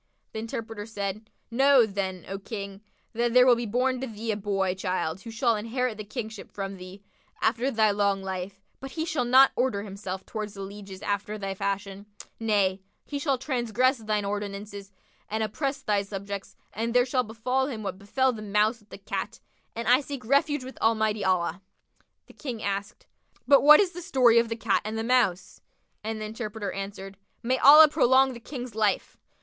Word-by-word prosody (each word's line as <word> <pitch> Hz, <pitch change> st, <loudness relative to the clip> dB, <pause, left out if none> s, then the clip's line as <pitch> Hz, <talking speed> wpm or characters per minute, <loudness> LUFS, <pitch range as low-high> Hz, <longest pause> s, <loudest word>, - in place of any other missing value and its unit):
The 220 Hz, -, -5 dB
interpreter 225 Hz, -1 st, -6 dB
said, 210 Hz, 0 st, -5 dB, 0.2 s
"Know 270 Hz, 0 st, +5 dB
then, 190 Hz, -3 st, -4 dB
O 195 Hz, +1 st, -5 dB
King, 200 Hz, -1 st, -7 dB, 0.3 s
that 235 Hz, +1 st, 0 dB
there 250 Hz, 0 st, +8 dB
will 250 Hz, -2 st, +6 dB
be 235 Hz, 0 st, -3 dB
born 250 Hz, +3 st, 0 dB
to 265 Hz, -, -3 dB
thee 225 Hz, 0 st, -4 dB
a -, -, -1 dB
boy 195 Hz, -2 st, -1 dB
child 185 Hz, -2 st, -2 dB
who 230 Hz, -, -9 dB
shall 230 Hz, +1 st, +1 dB
inherit 230 Hz, +2 st, -2 dB
the 215 Hz, -, -7 dB
Kingship 220 Hz, -1 st, -7 dB
from 195 Hz, -1 st, -5 dB
thee, 185 Hz, +2 st, -11 dB, 0.4 s
after 235 Hz, +4 st, +1 dB
thy 220 Hz, -4 st, +3 dB
long 200 Hz, -1 st, +1 dB
life; 190 Hz, +1 st, -5 dB, 0.2 s
but 270 Hz, -, -7 dB
he 320 Hz, -1 st, -2 dB
shall 290 Hz, -7 st, -1 dB
not 260 Hz, +3 st, +7 dB
order 240 Hz, -5 st, 0 dB
himself 195 Hz, -2 st, -6 dB
towards 215 Hz, -2 st, -5 dB
the 195 Hz, -, -6 dB
lieges 195 Hz, -1 st, -9 dB
after 205 Hz, +1 st, -2 dB
thy 195 Hz, -2 st, -4 dB
fashion; 200 Hz, +1 st, -4 dB, 0.3 s
nay, 200 Hz, -4 st, +1 dB, 0.2 s
he 285 Hz, -, -4 dB
shall 280 Hz, -2 st, +1 dB
transgress 255 Hz, -1 st, 0 dB
thine 215 Hz, -2 st, -1 dB
ordinances 200 Hz, 0 st, -5 dB, 0.4 s
and 220 Hz, +1 st, -1 dB
oppress 275 Hz, +6 st, -3 dB
thy 205 Hz, -1 st, +1 dB
subjects, 200 Hz, 0 st, -6 dB, 0.2 s
and 230 Hz, +3 st, -3 dB
there 245 Hz, 0 st, +5 dB
shall 255 Hz, 0 st, +1 dB
befal 250 Hz, +3 st, -1 dB
him 225 Hz, -6 st, -5 dB
what 195 Hz, -1 st, -5 dB
befel 260 Hz, +6 st, +1 dB
the 220 Hz, -, -8 dB
Mouse 210 Hz, +3 st, +1 dB
with 210 Hz, -1 st, -26 dB
the -, -, -9 dB
Cat[FN#60]; 200 Hz, +3 st, -5 dB, 0.4 s
and 230 Hz, +1 st, -4 dB
I 250 Hz, +3 st, +5 dB
seek 275 Hz, -4 st, -7 dB
refuge 280 Hz, +2 st, +2 dB
with 260 Hz, +1 st, -10 dB
Almighty 220 Hz, -1 st, +2 dB
Allah[FN#61]!" 185 Hz, -2 st, 0 dB, 0.6 s
The -, -, -17 dB
King 245 Hz, -7 st, -6 dB
asked, 200 Hz, +1 st, -4 dB, 0.4 s
"But 280 Hz, -, +7 dB
what 300 Hz, +1 st, +9 dB
is 390 Hz, -3 st, +2 dB
the 355 Hz, -, -8 dB
story 250 Hz, -7 st, +4 dB
of 230 Hz, -1 st, 0 dB
the 230 Hz, -, -2 dB
Cat 225 Hz, -3 st, +1 dB
and 215 Hz, +1 st, -4 dB
the 225 Hz, -, -2 dB
Mouse?"; 230 Hz, -7 st, +1 dB, 0.4 s
and 220 Hz, 0 st, -3 dB
the 215 Hz, -, -4 dB
interpreter 215 Hz, -2 st, -5 dB
answered 195 Hz, 0 st, -7 dB, 0.3 s
"May 255 Hz, +2 st, +1 dB
Allah 300 Hz, +3 st, +10 dB
prolong 265 Hz, -3 st, +4 dB
the 235 Hz, -, -9 dB
King's 250 Hz, -1 st, -7 dB
life! 210 Hz, -2 st, 0 dB
220 Hz, 190 wpm, -27 LUFS, 200-250 Hz, 0.6 s, Allah